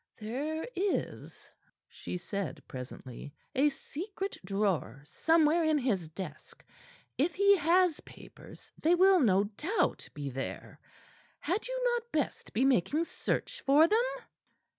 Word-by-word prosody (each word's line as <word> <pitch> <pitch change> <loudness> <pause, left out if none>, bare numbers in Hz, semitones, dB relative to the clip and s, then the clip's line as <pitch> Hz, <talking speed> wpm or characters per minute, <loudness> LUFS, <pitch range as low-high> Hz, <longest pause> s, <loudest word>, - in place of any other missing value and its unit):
"There 285 - -3
is," 385 +2 -3 0.4
she - - -6
said 195 0 -5
presently, 130 +2 -9 0.2
"a 280 +3 +4
secret 380 +8 -6
drawer 180 - -1
somewhere 320 - +3
in 315 -1 +3
his 205 - -1
desk. 160 -2 -9 0.5
If 315 +6 +1
he 400 +1 +6
has 345 0 +3
papers - - -14
they 335 +3 +4
will, 380 +1 +6
no 200 - +4
doubt, 295 - -1
be 140 -2 -4
there. 135 +1 -6 0.6
Had 365 +10 -2
you - - -3
not 475 0 -3
best 300 -4 -2
be 250 +4 +2
making 270 - +2
search 470 +7 -3
for 290 +4 +6
them?" 435 +5 +3
295 Hz, 125 wpm, -31 LUFS, -, 0.6 s, he